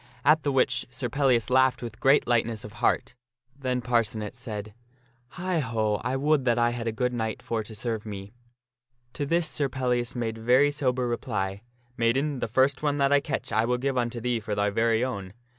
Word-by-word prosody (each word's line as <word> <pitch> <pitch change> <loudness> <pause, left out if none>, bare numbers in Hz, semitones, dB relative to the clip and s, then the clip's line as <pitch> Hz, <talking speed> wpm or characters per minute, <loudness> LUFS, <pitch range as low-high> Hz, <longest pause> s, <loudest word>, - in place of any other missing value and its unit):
At 155 +2 +5
the 145 - 0
which 130 -1 +1
Sir 125 -1 -4
Pellias 125 -3 +2
laughed 130 -1 +3
with 115 -2 -7
great 135 +2 +4
lightness 115 -2 +1
of 105 - -9
heart. - - +1 0.4
Then 130 -2 -2
Par 120 -1 +3
cenet 105 -1 -5
said, 105 -2 -6 0.3
" 120 0 -37
Heigh 180 -1 0
ho! 110 -5 0
I 125 +2 -1
would 145 0 +2
that 120 -1 +3
I 120 0 +3
had 120 -1 -4
a - - +1
good 125 +3 -1
knight 110 -2 -3
for 115 -1 -1
to 110 +1 -9
serve 110 0 -3
me." 100 -2 -7 0.8
To 145 - -3
this 170 +1 +2
Sir 145 -2 0
Pellias 125 -2 -1
made 115 -2 -3
very 125 +6 +4
sober 130 -3 0
reply, 100 -5 -2 0.2
" 120 0 -37
Maiden, 130 +5 +1
the - - -1
first 130 +4 +2
one 145 -1 0
that 140 -1 +2
I 145 - +6
catch 140 -4 -4
I 110 +1 +2
will 125 +1 +1
give 135 +1 -1
unto 120 -1 -1
thee 120 0 0
for 110 -2 -4
thy 105 0 +1
very 115 +2 +2
own. 100 -7 -5
120 Hz, 210 wpm, -27 LUFS, 110-135 Hz, 0.8 s, I